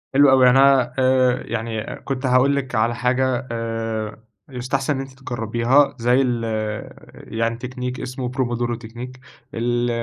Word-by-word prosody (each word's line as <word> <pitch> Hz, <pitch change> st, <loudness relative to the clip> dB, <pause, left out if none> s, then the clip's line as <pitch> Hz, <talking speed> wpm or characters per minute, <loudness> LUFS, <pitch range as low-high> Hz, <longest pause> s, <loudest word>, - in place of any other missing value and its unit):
حلو 140 Hz, 0 st, +7 dB
أوي 130 Hz, -1 st, +6 dB
يعني 125 Hz, +1 st, +6 dB
أنا 135 Hz, -3 st, +4 dB
آآ 130 Hz, -1 st, +3 dB
يعني 115 Hz, -1 st, -4 dB
كنت 135 Hz, 0 st, -4 dB
هاقول 130 Hz, +2 st, +4 dB
لِك 135 Hz, -3 st, -3 dB
على 115 Hz, +2 st, +1 dB
حاجة 130 Hz, +1 st, 0 dB
آآ 115 Hz, -1 st, -4 dB, 0.3 s
يُستحسن 135 Hz, +3 st, -2 dB
إن 135 Hz, -, -3 dB
أنتِ 135 Hz, 0 st, -11 dB
تجربيها 120 Hz, +3 st, +1 dB
زي 125 Hz, +3 st, +3 dB
ال 120 Hz, -3 st, 0 dB
آآ 110 Hz, -1 st, -4 dB, 0.2 s
يعني 115 Hz, +1 st, -3 dB
تكنيك 125 Hz, +1 st, -5 dB
اسمه 125 Hz, 0 st, -4 dB
pomodoro 120 Hz, -2 st, -1 dB
تكنيك 120 Hz, +3 st, -9 dB, 0.3 s
ال 120 Hz, +1 st, 0 dB
125 Hz, 150 wpm, -21 LUFS, 115-130 Hz, 0.3 s, حلو